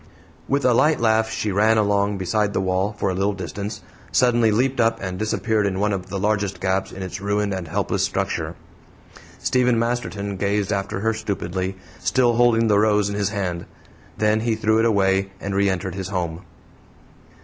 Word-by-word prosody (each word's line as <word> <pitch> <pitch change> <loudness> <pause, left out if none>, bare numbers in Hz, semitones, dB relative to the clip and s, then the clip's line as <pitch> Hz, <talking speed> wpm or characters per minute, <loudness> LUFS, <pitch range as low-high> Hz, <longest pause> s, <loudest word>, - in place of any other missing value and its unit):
With 140 0 0
a 125 - +5
light 150 +6 +3
laugh 110 -1 +2
she 110 -2 -2
ran 110 +3 +3
along 100 -1 +1
beside 100 +3 0
the - - 0
wall 95 +2 0
for 100 -1 0
a - - -2
little 100 +3 0
distance, 100 +2 -5 0.3
suddenly 120 -2 +3
leaped 125 +4 +1
up 115 0 +2
and 95 -1 -5
disappeared 110 -1 0
in 95 -1 -2
one 105 0 +1
of 95 -2 -4
the 100 - -3
largest 100 -1 0
gaps 95 +1 -1
in 95 - -7
its 90 0 -6
ruined 100 0 0
and 95 -3 -4
helpless 95 +5 -1
structure. - - -2 0.8
Stephen 125 -2 +2
Masterton 115 -4 -2
gazed 100 +1 0
after 100 0 -3
her 115 +1 +1
stupidly, 95 -3 -3 0.2
still 125 -2 +2
holding 115 -1 +4
the 105 -2 +4
rose 105 -1 +3
in 100 - -3
his 100 -1 0
hand. 95 -4 -3 0.5
Then 105 0 +2
he 115 0 0
threw 110 0 +2
it 115 - +3
away 95 -3 +2
and 100 - -4
re 100 0 +2
entered 95 -1 -2
his 95 -1 -4
home. 90 -3 -3
100 Hz, 185 wpm, -22 LUFS, 95-110 Hz, 0.8 s, a